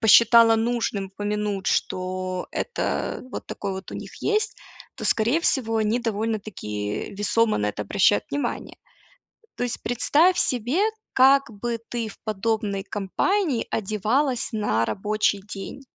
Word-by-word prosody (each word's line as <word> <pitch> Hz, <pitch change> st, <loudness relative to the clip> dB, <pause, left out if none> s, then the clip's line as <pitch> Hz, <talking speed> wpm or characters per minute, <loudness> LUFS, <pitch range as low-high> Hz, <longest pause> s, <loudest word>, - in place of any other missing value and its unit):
посчитала 230 Hz, +1 st, +7 dB
нужным 225 Hz, -4 st, -1 dB
упомянуть, 205 Hz, 0 st, -3 dB
что 185 Hz, 0 st, -1 dB
это 480 Hz, -, -2 dB
вот -, -, -6 dB
такой 200 Hz, -1 st, -4 dB
вот 190 Hz, +1 st, -7 dB
у -, -, -5 dB
них -, -, -8 dB
есть, 430 Hz, 0 st, +1 dB, 0.4 s
то, -, -, -6 dB
скорее 235 Hz, +9 st, +2 dB
всего, 225 Hz, -8 st, +1 dB
они 220 Hz, +2 st, +1 dB
довольно-таки 210 Hz, -, -3 dB
весомо 215 Hz, +2 st, +2 dB
на 105 Hz, -, 0 dB
это 105 Hz, -, -4 dB
обращают 195 Hz, -, +3 dB
внимание. 285 Hz, 0 st, -3 dB, 0.8 s
То -, -, -1 dB
есть 245 Hz, -, -4 dB
представь 310 Hz, +9 st, +3 dB
себе, 250 Hz, -, +1 dB, 0.3 s
как 270 Hz, 0 st, +5 dB
бы 230 Hz, +2 st, -3 dB
ты 235 Hz, -2 st, -2 dB
в 210 Hz, -, -12 dB
подобной 210 Hz, -2 st, -1 dB
компании 260 Hz, -, 0 dB
одевалась 225 Hz, +6 st, 0 dB
на 205 Hz, -, +1 dB
рабочий 210 Hz, 0 st, 0 dB
день. 205 Hz, +6 st, -8 dB
220 Hz, 130 wpm, -24 LUFS, 195-240 Hz, 0.8 s, посчитала